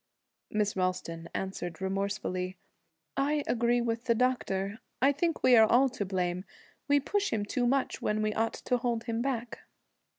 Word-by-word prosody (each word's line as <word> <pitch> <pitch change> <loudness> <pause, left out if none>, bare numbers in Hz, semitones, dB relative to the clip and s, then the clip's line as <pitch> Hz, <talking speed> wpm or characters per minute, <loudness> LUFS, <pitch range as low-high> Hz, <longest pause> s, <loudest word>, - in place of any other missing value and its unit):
Miss 210 -1 0
Ralston 185 -3 -2
answered 175 -3 -4
remorsefully. 190 -1 -2 0.6
'I 290 +1 +1
agree 240 0 +2
with 235 0 -2
the 235 - +3
doctor. 220 -4 0 0.2
I 270 +3 +5
think 325 +3 -1
we 255 - +7
are 220 -1 +7
all 265 +3 +5
to 205 - -3
blame. 180 -1 -1 0.4
We 285 0 +5
push 405 +8 0
him 210 -2 0
too 245 +4 0
much 270 +1 0
when 215 0 0
we 215 0 0
ought 225 +1 0
to 250 - 0
hold 235 -2 -1
him 230 -1 -2
back.' 240 -3 -2
225 Hz, 165 wpm, -30 LUFS, 195-250 Hz, 0.6 s, we